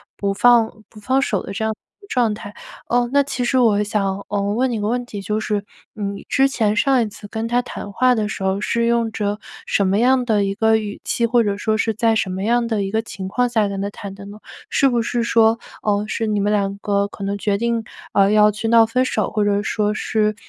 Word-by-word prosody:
不 200 -1 -1
放 235 +1 +5 0.2
不 215 - -15
放 260 +6 +1
手 220 -7 0
的 - - -8
这 220 +3 -2
样 220 - 0
一 315 - -29
个 405 - -16
状 240 - +1
态。 205 -1 -9 0.4
嗯， 240 0 +2
那 285 - +5
其 260 -2 -3
实 260 - +1
我 210 -4 +3
想， 200 -2 -2
嗯， 200 0 -1
问 255 +2 +1
你 - - -1
一 215 - -2
个 205 - -1
问 245 +1 -1
题， 205 -4 -7
就 210 +3 -2
是， 210 -2 -2 0.3
嗯， 200 -2 -3
你 - - -11
之 270 0 +4
前 220 -6 0
上 265 +1 +3
一 225 - 0
次 205 0 -11
跟 220 +2 -4
他 245 +1 +1
谈 205 -4 -8
话 255 +4 +3
的 215 -2 -1
时 195 - -5
候， 190 +1 0
是 235 +1 0
用 235 -1 +1
着 205 -1 -2 0.3
什 200 - +1
么 195 - +2
样 255 +1 +3
的 215 -4 +2
一 195 - -1
个 220 +1 +3
语 210 -2 -6
气， 235 - 0
或 235 0 +3
者 200 -1 -1
说 215 +1 0
是 225 0 0
在 225 +1 +2
什 195 - 0
么 190 +1 -4
样 235 +1 +1
的 220 -3 -1
一 195 - -3
个 220 +1 +1
情 195 -4 -7
况 245 +6 +1
下 220 -4 +1
跟 195 -1 -4
他 200 - -2
谈 200 -1 -8
的 200 0 -11
呢？ 205 +1 -10 0.3
是 275 - +3
不 240 -2 +1
是 235 +1 -1
说， 225 -1 +3 0.2
呃， 205 0 0
是 225 +1 -2
你 210 -1 0
们 205 +1 +1
2 200 -1 0
个， 200 0 0
可 200 0 -10
能 200 +1 -2
决 200 0 0
定， 235 +1 -1 0.3
呃， 195 +1 +4
要 210 0 +5
去 220 +2 -4
闹 230 0 +6
分 250 +3 +1
手， - - -1
或 210 -2 0
者 205 0 +1
说 210 -1 0
是， 215 0 0
215 Hz, 275 characters per minute, -20 LUFS, 205-235 Hz, 0.4 s, 闹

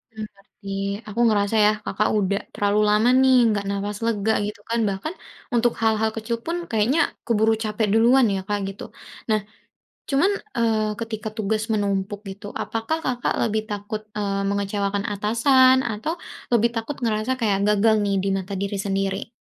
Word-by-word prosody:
Mmm, 215 - -5
ngerti, 195 0 -14 0.4
aku 210 +3 -5
ngerasa 205 0 +1
ya 210 - +6
Kakak 215 +2 0
udah 200 0 0
terlalu 205 +1 +1
lama 215 +3 +4
nih 260 -1 +5
enggak 205 -2 0
napas 200 +1 -3
lega 220 -1 +1 0.2
gitu 210 -1 -8
kan, 230 0 0
bahkan 200 - -4 0.4
untuk 240 0 +3
hal-hal 220 0 +2
kecil 225 +1 -3
pun 335 +1 -1 0.2
kayaknya 225 +8 +2 0.3
keburu 220 -1 +3
capek 215 0 -1
duluan 240 +3 +5
ya, - - -1
Kak, 205 0 0
gitu. 195 - -9 0.5
Nah 215 - +3 0.7
cuman, 290 +9 +3 0.3
eee, 215 -2 +1
ketika 220 -1 -4
tugas 215 +1 0
menumpuk 200 -1 -1
gitu 195 +1 -9 0.2
apakah 225 +8 -2
Kakak 245 -1 0
lebih 220 -1 +1
takut, 205 +1 -4 0.2
eee, 200 -1 -1
mengecewakan 200 0 -1
atasan 255 +5 +4
atau 220 +10 -3 0.4
lebih 235 0 +4
takut 230 +6 -3
ngerasa 220 +1 0
kayak 205 -4 +1
gagal 215 +1 +4
nih 200 -1 0
di 195 - 0
mata 190 +1 -6
diri 200 +1 -2
sendiri? 195 +2 -2
215 Hz, 160 wpm, -23 LUFS, 200-230 Hz, 0.7 s, ya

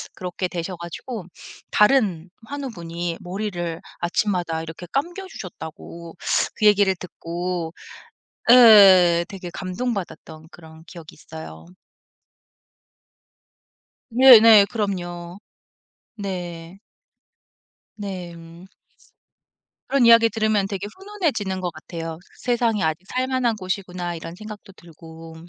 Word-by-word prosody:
그렇게 180 0 -4
되셔 175 +1 -5
가지고 180 +5 -7 0.5
다른 210 -7 +3 0.2
환우분이 175 -12 -5
머리를 175 -3 -4 0.2
아침마다 175 -3 -1
이렇게 165 +2 -9
감겨 350 +7 -3
주셨다고 170 - -10 0.4
그 215 - -1
얘기를 205 -2 +4
듣고 175 -1 -5 0.8
예 195 -8 +8
되게 185 -3 -8
감동받았던 180 -6 -5
그런 160 -1 -15
기억이 170 -3 -12
있어요. 145 - -11 2.4
네네. 230 -4 +8
그럼요. 175 -5 -4 0.8
네. 180 -3 -6 1.2
네. 190 -4 -6
음. 165 +2 -14 1.2
그런 275 -3 +3
이야기 230 0 +7
들으면 215 -2 0
되게 200 0 -5
훈훈해지는 325 - -2
것 180 -1 -3
같아요. 165 0 -7 0.2
'세상이 235 -4 0
아직 160 +3 -2
살만한 255 -2 0
곳이구나.' 185 -3 -4
이런 165 +1 -8
생각도 210 -1 -11
들고. 165 -1 -13
185 Hz, 230 characters per minute, -22 LUFS, 170-215 Hz, 2.4 s, 예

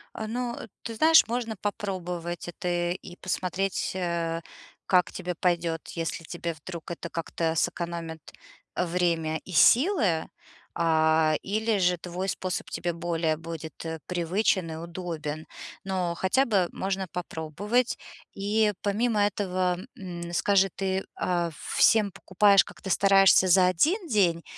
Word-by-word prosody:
А, 220 - -4
ну, 240 +1 -3
э, - - -8 0.2
ты 230 -1 -5
знаешь, 320 +2 +6
можно 230 -1 -2
попробовать 180 -4 -4
это 175 0 -1
и 180 0 -7
посмотреть, 185 +1 -2
э, 170 -2 -1 0.4
как 180 -2 +3
тебе 180 -1 -4
пойдёт, 170 -2 0
если 165 0 -3
тебе 170 0 -4
вдруг 165 +2 -8
это 170 0 -6
как-то 165 0 -5
сэкономит 165 -2 -2 0.5
время 170 -3 0
и - - -9
силы, 230 - +4 0.5
а, 160 -1 +3
или 215 +2 0
же 180 -1 +3
твой 180 +3 -4
способ 185 -1 -3
тебе 175 -1 -2
более 165 -2 -1
будет, 165 0 -8
э, 160 0 -4
привычен 180 0 0
и - - -5
удобен. 165 -2 -5 0.4
Но 185 -3 -1
хотя 195 +11 +2
бы 195 -6 +2
можно 190 -1 -2
попробовать. 180 - -1 0.4
И 210 +2 +1
помимо 210 +2 +1
этого, 185 -3 0 0.2
м, 175 -3 -6
скажи, 195 +1 +3
ты, 190 0 -1
а, 175 -2 0 0.3
всем 215 -3 +5
покупаешь, 195 +2 +4
как-то 190 - -10
стараешься 195 -1 +5
за 180 0 +6
1 330 - +2
день 180 - +2
180 Hz, 130 wpm, -27 LUFS, 170-200 Hz, 0.5 s, знаешь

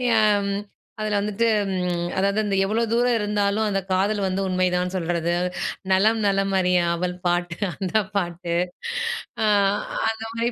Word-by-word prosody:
ஏன் 205 -2 +3 0.5
அதில 210 -1 0
வந்துட்டு 210 +3 0 0.3
ம் 175 -1 -1
அதாவது 200 +2 +2
அந்த 205 -2 0
எவ்ளோ 220 +4 0
தூரம் 240 +1 +3
இருந்தாலும் 210 0 0
அந்த 195 -1 0
காதல் 200 +3 +1
வந்து 190 +1 -1
உண்மைதான் 180 0 0
சொல்றது, 170 -1 0 0.6
நலம் 215 +4 +3
நலம் 195 0 +1
அறிய 180 -1 +3
ஆவல் 180 +1 -2
பாட்டு 175 0 0 0.2
அந்த 190 -3 -5 0.2
பாட்டு. 175 -2 -2 0.9
அ, - - +3 0.6
அந்த 225 0 -4
மாரி 230 +1 0
195 Hz, 135 wpm, -23 LUFS, 180-210 Hz, 0.9 s, ஏன்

